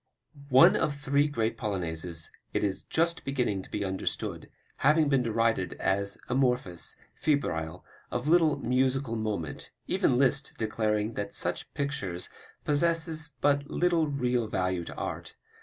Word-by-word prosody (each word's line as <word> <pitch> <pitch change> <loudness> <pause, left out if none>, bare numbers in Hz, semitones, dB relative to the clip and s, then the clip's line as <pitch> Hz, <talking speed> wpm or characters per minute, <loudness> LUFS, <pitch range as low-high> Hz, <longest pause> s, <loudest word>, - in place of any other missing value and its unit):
One 130 0 +7
of 145 - +1
three 140 0 +2
great 115 -6 -1
Polonaises, 85 -6 -3 0.2
it - - 0
is 95 -1 -1
just 170 +1 0
beginning 125 -8 0
to - - -13
be 105 -1 -2
understood, 95 0 -3 0.3
having 150 +1 +4
been 135 -2 +3
derided 115 -5 +1
as 100 +1 -1
amorphous, 125 -9 +1 0.2
febrile, 90 - -1 0.2
of 125 +3 -3
little 160 -3 +4
musical 130 -2 +1
moment, 105 -9 -3 0.2
even 120 - +2
Liszt 135 +1 +2
declaring 110 0 0
that 100 -2 -4
"such - - -2
pictures 100 -11 -2 0.4
possess 160 +1 +2
but 145 0 +2
little 170 -3 +2
real 125 -5 0
value 90 -3 -1
to - - -8
art. - - -5
125 Hz, 135 wpm, -29 LUFS, 100-145 Hz, 0.4 s, One